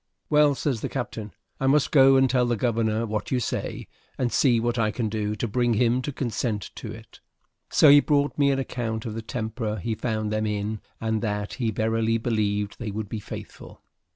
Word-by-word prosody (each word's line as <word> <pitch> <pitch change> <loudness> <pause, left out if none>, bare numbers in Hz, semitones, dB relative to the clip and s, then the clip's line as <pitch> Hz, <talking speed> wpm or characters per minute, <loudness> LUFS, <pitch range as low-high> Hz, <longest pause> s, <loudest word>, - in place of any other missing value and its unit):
"Well," 150 -1 +5
says 130 -5 -1
the - - -3
captain, 105 -2 -5 0.3
"I 135 - 0
must 140 +1 +3
go 135 -2 +7
and 135 0 +5
tell 125 -1 +2
the 120 - +1
governor 115 -1 0
what 110 -1 -3
you 130 - +1
say, 120 - -3 0.3
and 125 -2 0
see 120 -5 +4
what 120 +1 -1
I 110 -1 +2
can 110 0 -2
do 105 0 -2
to 115 - -2
bring 120 +1 +1
him 120 +3 +2
to 145 - -4
consent 115 - -3
to - - -6
it." - - -12 0.5
So - - +5
he 145 +1 +9
brought 145 -1 +1
me 140 -1 +3
an 135 - +2
account 115 -4 -3
of 110 - -4
the 115 - -4
temper 110 -1 -3
he 110 +4 -2
found 110 -1 -2
them 110 0 0
in 105 +1 -2 0.2
and 110 -1 -1
that 105 -2 -2
he 120 -4 -1
verily 110 +1 +1
believed 105 -3 -1
they 115 - -4
would 105 0 -5
be 110 - -4
faithful. - - -10
115 Hz, 210 wpm, -25 LUFS, 110-125 Hz, 0.5 s, he